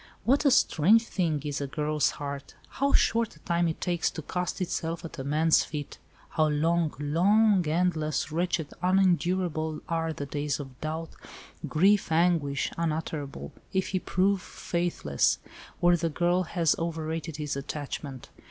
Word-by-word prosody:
What 275 Hz, +5 st, +3 dB
a -, -, +7 dB
strange 220 Hz, -, +4 dB
thing 165 Hz, -9 st, -1 dB
is 145 Hz, -1 st, -2 dB
a 140 Hz, -, -2 dB
girl's 150 Hz, +1 st, 0 dB
heart! 140 Hz, -1 st, -6 dB
How 280 Hz, +1 st, 0 dB
short 230 Hz, -, +2 dB
a -, -, -18 dB
time 170 Hz, -1 st, +1 dB
it 160 Hz, -, -3 dB
takes 175 Hz, -2 st, 0 dB
to 160 Hz, -, -7 dB
cast 180 Hz, +5 st, -3 dB
itself 165 Hz, -2 st, -3 dB
at 165 Hz, -1 st, -8 dB
a -, -, -3 dB
man's 155 Hz, +3 st, +3 dB
feet. 150 Hz, -2 st, -6 dB, 0.3 s
How 155 Hz, -1 st, +2 dB
long—long—endless, 165 Hz, +1 st, +2 dB
wretched, 170 Hz, -2 st, -1 dB
unendurable 180 Hz, -4 st, +1 dB
are 165 Hz, -1 st, -1 dB
the 145 Hz, -2 st, -5 dB
days 145 Hz, 0 st, -2 dB
of 135 Hz, -3 st, -9 dB
doubt, 160 Hz, +1 st, -4 dB, 0.6 s
grief, 195 Hz, +3 st, +3 dB
anguish 160 Hz, -4 st, +2 dB
unutterable, 155 Hz, -, -3 dB, 0.2 s
if 190 Hz, -1 st, 0 dB
he 185 Hz, -, 0 dB
prove 190 Hz, +2 st, +1 dB
faithless, 170 Hz, -, 0 dB, 0.4 s
or 175 Hz, 0 st, +5 dB
the 165 Hz, -1 st, -1 dB
girl 175 Hz, +3 st, +1 dB
has 165 Hz, -1 st, +1 dB
over 165 Hz, -1 st, -3 dB
rated 160 Hz, -1 st, -4 dB
his 150 Hz, -2 st, -3 dB
attachment. 140 Hz, -1 st, -6 dB
165 Hz, 145 wpm, -28 LUFS, 150-180 Hz, 0.6 s, a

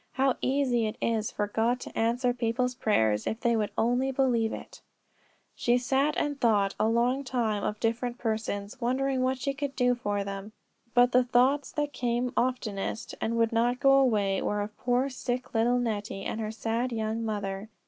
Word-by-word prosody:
How 265 Hz, -1 st, +2 dB
easy 255 Hz, -4 st, +1 dB
it 215 Hz, -, -5 dB
is 225 Hz, -2 st, 0 dB
for 210 Hz, -, -2 dB
God 225 Hz, +4 st, 0 dB
to -, -, -9 dB
answer 240 Hz, +2 st, +1 dB
people's 245 Hz, +1 st, 0 dB
prayers, 110 Hz, -, +1 dB
if 220 Hz, -, -2 dB
they 235 Hz, -1 st, +2 dB
would 210 Hz, -2 st, 0 dB
only 245 Hz, +4 st, +1 dB
believe 245 Hz, -4 st, +1 dB
it! -, -, -9 dB, 0.7 s
She 240 Hz, 0 st, +2 dB
sat 270 Hz, +4 st, +1 dB
and 290 Hz, -2 st, -1 dB
thought 205 Hz, -4 st, +3 dB
a 215 Hz, -, +3 dB
long 240 Hz, +4 st, +1 dB
time 230 Hz, -6 st, -1 dB
of 210 Hz, -, -2 dB
different 240 Hz, +1 st, -1 dB
persons, 220 Hz, 0 st, -3 dB
wondering 260 Hz, +2 st, 0 dB
what 260 Hz, +1 st, +1 dB
she 275 Hz, +2 st, -2 dB
could 280 Hz, -1 st, -4 dB
do 250 Hz, -1 st, +3 dB
for 205 Hz, -4 st, -2 dB
them. 200 Hz, +2 st, -6 dB, 0.4 s
But 245 Hz, 0 st, +5 dB
the 250 Hz, 0 st, +5 dB
thoughts 255 Hz, +4 st, +2 dB
that 295 Hz, -1 st, -2 dB
came 245 Hz, 0 st, -1 dB
oftenest, 225 Hz, -3 st, -2 dB
and 230 Hz, +1 st, -1 dB
would 230 Hz, -1 st, +2 dB
not 240 Hz, +2 st, +2 dB
go 275 Hz, -1 st, +5 dB
away, 205 Hz, -7 st, +2 dB
were 210 Hz, 0 st, -1 dB
of 210 Hz, +1 st, -5 dB
poor 250 Hz, +2 st, +1 dB
sick 250 Hz, -1 st, -4 dB
little 235 Hz, +2 st, +3 dB
Nettie, 210 Hz, -4 st, -2 dB
and 225 Hz, -, -3 dB
her 215 Hz, -, -2 dB
sad 230 Hz, +3 st, -2 dB
young 220 Hz, 0 st, -2 dB
mother. 205 Hz, -1 st, -3 dB
235 Hz, 185 wpm, -28 LUFS, 220-255 Hz, 0.7 s, But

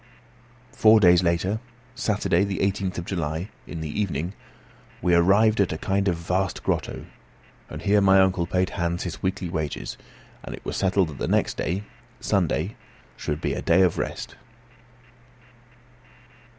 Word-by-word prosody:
Four 110 Hz, 0 st, +6 dB
days 90 Hz, -3 st, +6 dB
later, 90 Hz, +4 st, 0 dB, 0.3 s
Saturday, 105 Hz, -7 st, +1 dB
the 100 Hz, -1 st, -2 dB
18th 95 Hz, -1 st, -1 dB
of 85 Hz, -, -4 dB
July, 85 Hz, +1 st, -3 dB, 0.2 s
in 85 Hz, -, -6 dB
the 80 Hz, +6 st, -2 dB
evening, 90 Hz, -2 st, -2 dB, 0.7 s
we 90 Hz, 0 st, +1 dB
arrived 100 Hz, +6 st, +4 dB
at 95 Hz, -, +1 dB
a 80 Hz, -, -3 dB
kind 100 Hz, +4 st, 0 dB
of 90 Hz, -, +2 dB
vast 90 Hz, +3 st, -2 dB
grotto; -, -, -2 dB, 0.6 s
and 75 Hz, +2 st, -8 dB
here 100 Hz, +2 st, +4 dB
my 95 Hz, 0 st, +6 dB
uncle 95 Hz, -2 st, +2 dB
paid 90 Hz, 0 st, 0 dB
Hans 85 Hz, +1 st, -2 dB
his 90 Hz, -3 st, -6 dB
weekly 95 Hz, -1 st, -2 dB
wages, 80 Hz, -4 st, -4 dB, 0.4 s
and -, -, -6 dB
it -, -, -16 dB
was -, -, -3 dB
settled 95 Hz, -2 st, +2 dB
that 70 Hz, -, -9 dB
the -, -, -1 dB
next -, -, +1 dB
day, 95 Hz, +4 st, -2 dB, 0.4 s
Sunday, -, -, 0 dB, 0.4 s
should 75 Hz, +4 st, -3 dB
be -, -, -1 dB
a -, -, -3 dB
day 90 Hz, +3 st, +4 dB
of 90 Hz, -, +1 dB
rest. -, -, -4 dB
90 Hz, 155 wpm, -25 LUFS, 85-100 Hz, 0.7 s, Four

